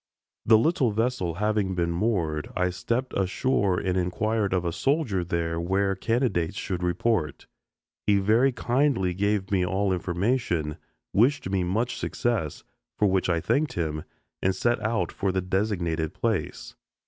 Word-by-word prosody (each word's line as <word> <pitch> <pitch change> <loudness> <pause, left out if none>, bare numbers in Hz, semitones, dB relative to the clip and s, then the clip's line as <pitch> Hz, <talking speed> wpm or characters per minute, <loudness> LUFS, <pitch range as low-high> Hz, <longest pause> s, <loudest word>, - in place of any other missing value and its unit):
The 110 0 +8
little 140 +1 +2
vessel 110 -6 -1
having 105 -1 0
been 85 -1 0
moored, 85 -6 -1
I 90 0 +1
stepped 120 +8 -2
ashore 100 -1 +1
and 95 -2 -1
inquired 100 +4 0
of 90 -2 0
a 85 - 0
soldier 125 - 0
there 85 -1 -2
where 95 +3 +1
candidates 100 -5 0
should 90 -3 -3
report. 90 -3 0 0.6
He 105 -1 +5
very 110 +7 +3
kindly 120 -6 +1
gave 100 +1 0
me 95 -2 +2
all 95 +2 +1
information, 90 - -1 0.4
wished 120 -2 +2
me 95 -2 +1
much 115 +7 -1
success, 105 -12 -2 0.3
for 105 - +3
which 95 -1 +1
I 85 -2 +2
thanked 140 - 0
him, 75 -3 -2 0.4
and 95 0 +1
set 120 +5 +1
out 110 +1 -1
for 100 -1 -1
the 95 - 0
designated 90 -4 -1
place. 110 -9 -2
95 Hz, 150 wpm, -26 LUFS, 90-115 Hz, 0.6 s, The